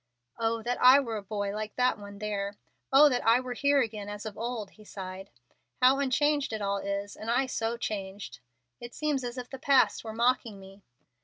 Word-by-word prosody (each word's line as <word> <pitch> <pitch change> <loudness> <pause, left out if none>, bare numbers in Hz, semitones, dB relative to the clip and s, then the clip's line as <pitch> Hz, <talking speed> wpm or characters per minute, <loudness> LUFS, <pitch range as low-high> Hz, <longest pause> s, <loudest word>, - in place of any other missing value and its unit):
"Oh 225 0 0
that 245 +2 -2
I 255 +2 +8
were 230 -5 -3
a - - -5
boy 200 0 -3
like 215 0 -5
that 250 -3 +2
one 200 0 -10
there! 205 -1 -3 0.4
Oh 280 +3 +8
that 250 -4 0
I 230 +2 +5
were 255 -1 -5
here 280 +2 +3
again 210 -3 -4
as 205 +1 -7
of 215 -2 -6
old!" 230 -3 -4
he 215 - -17
sighed. 190 -1 -8 0.5
"How 260 +2 +5
unchanged 285 0 +1
it 220 - -2
all 200 -1 -1
is, 200 +1 -4
and 220 - -7
I 250 +3 +2
so 230 -2 -2
changed! 200 -3 -5 0.4
It 240 0 -10
seems 295 -4 -1
as 245 +1 -5
if 250 -1 -5
the 270 - -7
past 275 -1 +3
were 220 -1 -6
mocking 235 -2 0
me. 195 +1 -14
225 Hz, 210 wpm, -29 LUFS, 205-255 Hz, 0.5 s, I